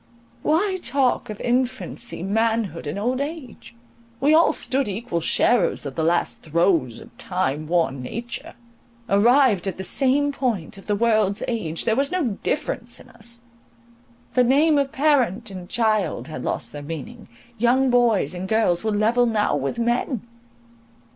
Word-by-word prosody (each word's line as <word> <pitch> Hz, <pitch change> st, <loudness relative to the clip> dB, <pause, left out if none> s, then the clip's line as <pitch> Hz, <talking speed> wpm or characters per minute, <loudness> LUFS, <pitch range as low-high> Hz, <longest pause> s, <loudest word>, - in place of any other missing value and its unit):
Why 375 Hz, +5 st, +1 dB
talk 265 Hz, -4 st, 0 dB
of 210 Hz, -, -6 dB
infancy, 245 Hz, -4 st, -1 dB
manhood, 220 Hz, -4 st, 0 dB
and 145 Hz, -, -3 dB
old 250 Hz, +6 st, -1 dB
age? 285 Hz, -6 st, -7 dB, 0.4 s
We 290 Hz, +3 st, +3 dB
all 330 Hz, +2 st, +5 dB
stood 265 Hz, -1 st, 0 dB
equal 200 Hz, -4 st, -3 dB
sharers 240 Hz, +4 st, +2 dB
of 140 Hz, -, -5 dB
the 160 Hz, -, -2 dB
last 170 Hz, +2 st, 0 dB
throes 165 Hz, -, +1 dB
of -, -, -15 dB
time 155 Hz, -5 st, -2 dB
worn 160 Hz, -6 st, 0 dB
nature. 230 Hz, -, -6 dB, 0.5 s
Arrived 225 Hz, -1 st, +4 dB
at 190 Hz, -, -3 dB
the 190 Hz, -, -5 dB
same 275 Hz, +7 st, +2 dB
point 220 Hz, -, -3 dB
of -, -, -16 dB
the 205 Hz, -, +1 dB
world's 215 Hz, -2 st, +1 dB
age—there 220 Hz, -1 st, -1 dB
was 275 Hz, +5 st, +1 dB
no 295 Hz, -, -1 dB
difference 245 Hz, -5 st, -2 dB
in -, -, -15 dB
us; 235 Hz, +1 st, -4 dB, 0.9 s
the 250 Hz, -, +4 dB
name 290 Hz, +4 st, +4 dB
of 275 Hz, -1 st, -1 dB
parent 260 Hz, -8 st, +1 dB
and 180 Hz, -2 st, -9 dB
child 215 Hz, -7 st, 0 dB
had 155 Hz, -, -6 dB
lost -, -, -2 dB
their 145 Hz, -, -7 dB
meaning; 165 Hz, +11 st, -8 dB, 0.3 s
young 250 Hz, +3 st, +3 dB
boys 240 Hz, -6 st, +3 dB
and 185 Hz, +1 st, -5 dB
girls 220 Hz, -5 st, +2 dB
were 220 Hz, -, 0 dB
level 225 Hz, +4 st, +2 dB
now 215 Hz, -8 st, +1 dB
with 140 Hz, -, -2 dB
men. 240 Hz, 0 st, -1 dB
230 Hz, 155 wpm, -23 LUFS, 185-255 Hz, 0.9 s, all